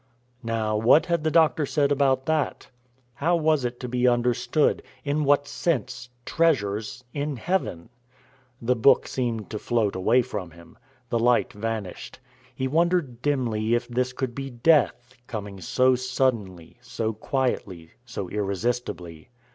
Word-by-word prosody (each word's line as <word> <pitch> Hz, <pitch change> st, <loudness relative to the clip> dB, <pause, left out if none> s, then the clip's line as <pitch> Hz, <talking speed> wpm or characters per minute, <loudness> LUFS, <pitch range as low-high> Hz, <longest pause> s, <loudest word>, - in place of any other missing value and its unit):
Now 115 Hz, -2 st, -1 dB
what 115 Hz, +8 st, +5 dB
had 170 Hz, -3 st, 0 dB
the 160 Hz, -, +2 dB
Doctor 160 Hz, -1 st, +3 dB
said 145 Hz, 0 st, +1 dB
about 135 Hz, -2 st, +2 dB
that? 155 Hz, -1 st, -1 dB, 0.4 s
How 165 Hz, +8 st, +1 dB
was 155 Hz, -4 st, +2 dB
it 120 Hz, 0 st, -3 dB
to 125 Hz, -, -4 dB
be 125 Hz, +1 st, +1 dB
understood 125 Hz, +5 st, +2 dB, 0.2 s
in 145 Hz, +1 st, 0 dB
what 145 Hz, 0 st, +3 dB
sense 130 Hz, -6 st, -2 dB, 0.2 s
treasures 115 Hz, -8 st, 0 dB
in 145 Hz, 0 st, -2 dB
heaven? 115 Hz, -, -2 dB, 0.7 s
The 125 Hz, +2 st, +1 dB
book 120 Hz, +3 st, +4 dB
seemed 115 Hz, -5 st, -3 dB
to 105 Hz, -, -4 dB
float 110 Hz, -5 st, 0 dB
away 115 Hz, +7 st, +3 dB
from 100 Hz, -6 st, -5 dB
him. 85 Hz, +1 st, -16 dB, 0.3 s
The 115 Hz, -, +1 dB
light 120 Hz, +1 st, +2 dB
vanished. 105 Hz, -3 st, -5 dB, 0.4 s
He 130 Hz, -, -1 dB
wondered 160 Hz, -5 st, +1 dB
dimly 120 Hz, -6 st, 0 dB
if 120 Hz, 0 st, -2 dB
this 125 Hz, +1 st, -1 dB
could 130 Hz, -1 st, -3 dB
be 135 Hz, +2 st, -5 dB
Death, 125 Hz, -1 st, +2 dB
coming 100 Hz, -5 st, -6 dB
so 130 Hz, +9 st, +3 dB
suddenly, 120 Hz, -9 st, -1 dB
so 125 Hz, -3 st, -3 dB
quietly, 105 Hz, -8 st, -2 dB
so 120 Hz, -6 st, -6 dB
irresistibly. 100 Hz, -4 st, -3 dB
125 Hz, 140 wpm, -25 LUFS, 110-140 Hz, 0.7 s, what